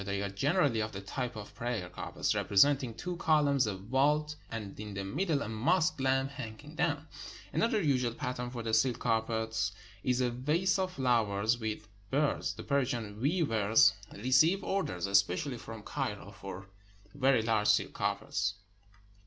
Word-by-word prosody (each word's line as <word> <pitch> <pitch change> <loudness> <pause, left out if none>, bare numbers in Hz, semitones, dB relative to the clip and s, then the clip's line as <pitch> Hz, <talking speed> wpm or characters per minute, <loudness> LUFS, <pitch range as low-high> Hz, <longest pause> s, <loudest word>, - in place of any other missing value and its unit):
They 100 0 -2
are 100 - -2
generally 140 - +1
of 110 0 -2
the 95 - -5
type 120 +4 -4
of 105 -2 -8
prayer 120 -6 -3
carpets, 90 - -2
repre 100 - -2
senting 135 -1 +4
two 180 -1 -4
columns, 145 -6 +3
a 100 - -2
vault, 145 +8 +1
and 105 -4 -6
in 105 -2 -6
the 95 - -3
middle 145 - 0
a - - -5
mosque 155 - +1
lamp 135 +1 +1
hanging 130 +4 -8
down. 160 -2 0 0.5
Another 230 -1 +2
usual 130 -8 +1
pattern 125 -1 -3
for 120 -2 -6
the 110 -1 -3
silk 120 +2 +3
carpets 110 -2 0 0.3
is 125 0 +1
a 125 -1 +1
vase 160 +10 +1
of 185 -1 -1
flowers 115 - +1
with 110 -2 -4 0.2
birds. 145 +3 0
The - - -8
Persian 120 -7 -1
weavers 140 - +4 0.2
receive 130 - +3
orders, 90 - -1
especially 100 +7 +1
from 115 -2 -9
Cairo, 105 -8 -4
for 95 -1 -8 0.5
very 135 -4 +3
large 110 -2 +1
silk - - +3
carpets. 95 0 -1
120 Hz, 160 wpm, -31 LUFS, 105-145 Hz, 0.5 s, senting